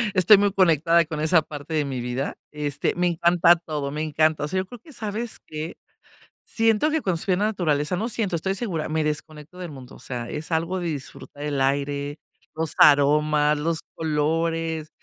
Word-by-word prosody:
Estoy 185 Hz, +3 st, +7 dB
muy 205 Hz, 0 st, +2 dB
conectada 170 Hz, -3 st, +3 dB
con 155 Hz, -1 st, -5 dB
esa 160 Hz, 0 st, +4 dB
parte 150 Hz, +1 st, -7 dB
de 150 Hz, -2 st, +1 dB
mi 130 Hz, -3 st, -4 dB
vida, 125 Hz, +3 st, -3 dB, 0.2 s
este, 145 Hz, -1 st, -2 dB
me 180 Hz, 0 st, +1 dB
encanta 170 Hz, 0 st, +4 dB
todo, 150 Hz, -4 st, -4 dB
me 150 Hz, +2 st, -4 dB
encanta, 155 Hz, 0 st, +1 dB
o -, -, -4 dB
sea, 185 Hz, -, -3 dB
yo -, -, -7 dB
creo 240 Hz, +4 st, -11 dB
que, 305 Hz, +5 st, -15 dB
¿sabes 220 Hz, 0 st, -4 dB
qué?, 155 Hz, +1 st, -6 dB, 0.7 s
siento 225 Hz, +6 st, +2 dB
que 315 Hz, 0 st, 0 dB
cuando 180 Hz, -7 st, -1 dB
estoy 190 Hz, -, 0 dB
en 180 Hz, -, 0 dB
la 210 Hz, -, +2 dB
naturaleza 155 Hz, -5 st, 0 dB
no 220 Hz, +6 st, -2 dB
siento, 205 Hz, -6 st, -1 dB
estoy 190 Hz, +4 st, -1 dB
segura, 185 Hz, -7 st, -2 dB
me 155 Hz, 0 st, 0 dB
desconecto 155 Hz, +2 st, -5 dB
del 180 Hz, -3 st, -6 dB
mundo, 130 Hz, -2 st, -11 dB
o -, -, -15 dB
sea, 120 Hz, -2 st, -6 dB
es 155 Hz, +3 st, -6 dB
algo 165 Hz, +3 st, 0 dB
de 175 Hz, -, -4 dB
disfrutar 145 Hz, 0 st, -7 dB
el 145 Hz, -2 st, -2 dB
aire, 140 Hz, +1 st, -1 dB, 0.3 s
los 160 Hz, -1 st, -1 dB
aromas, 150 Hz, +1 st, +5 dB
los 160 Hz, +2 st, -1 dB, 0.2 s
colores. 160 Hz, +1 st, -1 dB
160 Hz, 195 wpm, -24 LUFS, 150-180 Hz, 0.7 s, Estoy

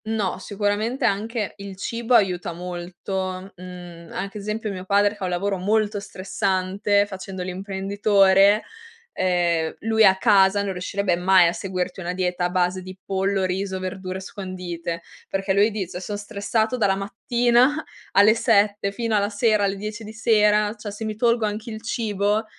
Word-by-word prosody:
No, 215 Hz, -4 st, -1 dB
sicuramente 205 Hz, +5 st, -1 dB
anche 215 Hz, +1 st, -1 dB
il 200 Hz, -1 st, -8 dB
cibo 235 Hz, +4 st, 0 dB
aiuta 180 Hz, -5 st, +2 dB
molto, 185 Hz, +2 st, -5 dB
mhmm, 175 Hz, -2 st, -10 dB
anche 195 Hz, +2 st, -5 dB
esempio, 215 Hz, +1 st, -3 dB
mio 185 Hz, -2 st, -6 dB
padre 205 Hz, +1 st, +3 dB
fa 205 Hz, -3 st, -5 dB
un -, -, -1 dB
lavoro 195 Hz, +3 st, -1 dB
molto 210 Hz, +2 st, +1 dB
stressante, 195 Hz, +1 st, 0 dB
facendo 190 Hz, -1 st, -7 dB
l'imprenditore, 195 Hz, +2 st, +3 dB, 0.5 s
ehm, 175 Hz, -3 st, +1 dB
lui 220 Hz, 0 st, +3 dB
a 190 Hz, -2 st, +6 dB
casa 200 Hz, -1 st, +4 dB
non 200 Hz, -, -2 dB
riuscirebbe 185 Hz, 0 st, -1 dB
mai 180 Hz, 0 st, +5 dB
a -, -, +2 dB
seguirti 185 Hz, -1 st, -4 dB
una 180 Hz, -1 st, -3 dB
dieta 180 Hz, -1 st, -1 dB
a -, -, 0 dB
base 180 Hz, +1 st, 0 dB
di 185 Hz, +1 st, -10 dB
pollo, 195 Hz, 0 st, 0 dB
riso, 190 Hz, +1 st, -2 dB
verdure 185 Hz, 0 st, -5 dB
scondite, 180 Hz, -3 st, -6 dB, 0.3 s
perché 195 Hz, 0 st, -1 dB
lui 200 Hz, +3 st, +4 dB
dice: 190 Hz, -4 st, -5 dB
"Son 205 Hz, +2 st, -4 dB
stressato 220 Hz, +3 st, -1 dB
dalla 200 Hz, -4 st, +2 dB
mattina 240 Hz, +7 st, +2 dB, 0.3 s
alle 205 Hz, +2 st, +6 dB
7 205 Hz, -3 st, +2 dB
fino 225 Hz, +2 st, -1 dB
alla 205 Hz, 0 st, +2 dB
sera, 215 Hz, -1 st, +2 dB
alle 195 Hz, 0 st, 0 dB
10 210 Hz, +2 st, -6 dB
di 215 Hz, +1 st, -9 dB
sera, 210 Hz, -2 st, +3 dB
cioè 210 Hz, 0 st, -6 dB
se 210 Hz, +2 st, -6 dB
mi 215 Hz, -1 st, -3 dB
tolgo 235 Hz, 0 st, +2 dB
anche 210 Hz, +2 st, -4 dB
il 220 Hz, -1 st, -6 dB
cibo, 210 Hz, -1 st, 0 dB
200 Hz, 160 wpm, -23 LUFS, 185-210 Hz, 0.5 s, a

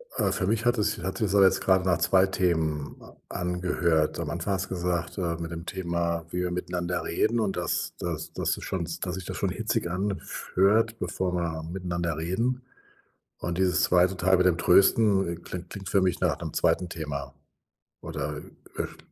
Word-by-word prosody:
Äh, -, -, +2 dB
für 95 Hz, -, -1 dB
mich 115 Hz, +2 st, +1 dB
hatte 120 Hz, -2 st, +3 dB
es -, -, 0 dB
hatte 95 Hz, +4 st, -2 dB
es 100 Hz, -, -1 dB
jetzt 95 Hz, -2 st, +5 dB
gerade 95 Hz, -1 st, +3 dB
nach 90 Hz, -3 st, +3 dB
zwei 95 Hz, +2 st, +4 dB
Themen 80 Hz, -6 st, 0 dB
a -, -, -14 dB
angehört. 90 Hz, -3 st, 0 dB
Am 80 Hz, -3 st, -2 dB
Anfang 85 Hz, +5 st, -2 dB
hast 95 Hz, 0 st, -2 dB
gesagt: 90 Hz, 0 st, -2 dB
„Äh, 85 Hz, -3 st, -1 dB
mit 85 Hz, 0 st, -5 dB
dem 85 Hz, +1 st, -6 dB
Thema, 85 Hz, -2 st, -2 dB
wie 90 Hz, -, -3 dB
wir 90 Hz, -, -1 dB
miteinander 90 Hz, 0 st, -2 dB
reden 110 Hz, +7 st, +1 dB
und 95 Hz, -4 st, -1 dB
dass 90 Hz, -, -1 dB
dass -, -, -4 dB
das -, -, 0 dB
schon 85 Hz, -3 st, -2 dB
dass 90 Hz, -1 st, -2 dB
sich 95 Hz, -, -6 dB
das -, -, -5 dB
schon -, -, 0 dB
hitzig -, -, -1 dB
anf 95 Hz, +1 st, -3 dB
hört, 110 Hz, +4 st, +4 dB
bevor 90 Hz, +1 st, -2 dB
wir 80 Hz, -2 st, -2 dB
miteinander 85 Hz, -1 st, -3 dB
reden.“ 115 Hz, +10 st, -1 dB, 0.8 s
Und 85 Hz, +1 st, -3 dB
dieses 90 Hz, -4 st, +3 dB
zweite 90 Hz, +1 st, +3 dB
Teil 95 Hz, +1 st, +4 dB
mit 90 Hz, -, +3 dB
dem 85 Hz, -2 st, +3 dB
Trösten, 95 Hz, +2 st, +4 dB
äh, 85 Hz, -, -2 dB
klingt 85 Hz, +1 st, -8 dB
klingt 95 Hz, -2 st, -7 dB
für 100 Hz, -, +3 dB
mich 90 Hz, -2 st, +1 dB
nach -, -, +1 dB
'nem -, -, -5 dB
zweiten 90 Hz, -, +1 dB
Thema 70 Hz, -4 st, -5 dB, 0.7 s
oder, -, -, -4 dB
äh, -, -, -8 dB, 0.3 s
verst -, -, -4 dB
90 Hz, 190 wpm, -27 LUFS, 85-95 Hz, 0.8 s, jetzt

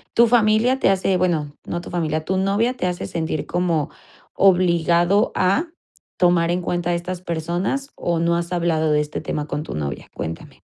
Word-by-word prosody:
¿tu 235 Hz, +1 st, +6 dB
familia 230 Hz, +2 st, +3 dB
te -, -, +3 dB
hace? 190 Hz, -1 st, +2 dB
Bueno, 160 Hz, -5 st, 0 dB
no 175 Hz, -, -3 dB
tu -, -, -10 dB
familia. 155 Hz, -2 st, -1 dB
¿Tu 190 Hz, +2 st, 0 dB
novia 200 Hz, +6 st, +1 dB
te 185 Hz, -, -2 dB
hace 175 Hz, -1 st, -3 dB
sentir 160 Hz, -2 st, -3 dB
como 170 Hz, -4 st, 0 dB, 0.4 s
obligado 175 Hz, 0 st, +3 dB
a 200 Hz, -, +2 dB, 0.5 s
tomar 175 Hz, -2 st, +3 dB
en 180 Hz, +1 st, 0 dB
cuenta 175 Hz, 0 st, -1 dB
estas 175 Hz, +1 st, -4 dB
personas, 175 Hz, -, -2 dB
o 170 Hz, -1 st, -1 dB
no 170 Hz, 0 st, +2 dB
has 170 Hz, +1 st, -3 dB
hablado 165 Hz, -3 st, +1 dB
de 150 Hz, -, +3 dB
este 150 Hz, 0 st, -5 dB
tema 150 Hz, -, -3 dB
con 150 Hz, -, -3 dB
tu -, -, -7 dB
novia? 70 Hz, -3 st, -4 dB
Cuéntame. 80 Hz, -, -7 dB
175 Hz, 180 wpm, -21 LUFS, 165-190 Hz, 0.5 s, tu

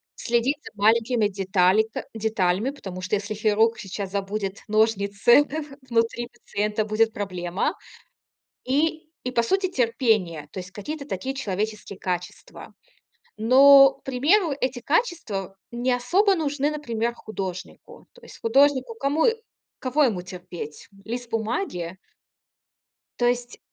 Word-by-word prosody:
следить 240 Hz, +4 st, 0 dB
за -, -, -10 dB
маленькими 225 Hz, +2 st, +3 dB
деталика 195 Hz, +2 st, +1 dB
деталями, 215 Hz, +1 st, 0 dB
потому 190 Hz, -10 st, -8 dB
что, 185 Hz, +2 st, -5 dB
если 205 Hz, +1 st, -4 dB
хирург 220 Hz, +2 st, +2 dB
сейчас 195 Hz, -2 st, -5 dB
забудет 200 Hz, 0 st, -3 dB
ножницы 215 Hz, +3 st, +4 dB, 0.5 s
внутри 235 Hz, 0 st, 0 dB
пациента, 210 Hz, -2 st, -2 dB
будет 220 Hz, +1 st, +2 dB
проблема. 185 Hz, -, -2 dB, 0.9 s
И, 310 Hz, +4 st, 0 dB, 0.2 s
и 250 Hz, -, -1 dB
по 240 Hz, -2 st, +2 dB
сути- 380 Hz, +7 st, +1 dB
терпение, 225 Hz, -, +1 dB
то -, -, -7 dB
есть 185 Hz, 0 st, -10 dB
какие-то 280 Hz, +9 st, -6 dB
такие 265 Hz, -2 st, -4 dB
человеческие 210 Hz, -3 st, -4 dB
качества. 180 Hz, -1 st, -6 dB, 0.6 s
Но, 275 Hz, +5 st, +8 dB
к -, -, -27 dB
примеру, 300 Hz, +7 st, +2 dB
эти 255 Hz, -1 st, -1 dB
качества 245 Hz, -, -1 dB
не 245 Hz, +1 st, 0 dB
особо 365 Hz, -, +3 dB
нужны, 295 Hz, -3 st, 0 dB
например, 235 Hz, -6 st, -2 dB
художнику. 195 Hz, -5 st, -8 dB
То 485 Hz, -, -20 dB
есть 475 Hz, -, -14 dB
художнику 275 Hz, -, +3 dB
кому 295 Hz, -4 st, +1 dB, 0.5 s
кого 270 Hz, +4 st, +2 dB
ему 205 Hz, -9 st, 0 dB
терпеть? 180 Hz, -4 st, -9 dB, 0.2 s
Лист 240 Hz, +2 st, -5 dB
бумаги? 220 Hz, -, -3 dB, 1.2 s
То 240 Hz, -, +2 dB
есть 245 Hz, 0 st, -2 dB
225 Hz, 120 wpm, -24 LUFS, 200-265 Hz, 1.2 s, Но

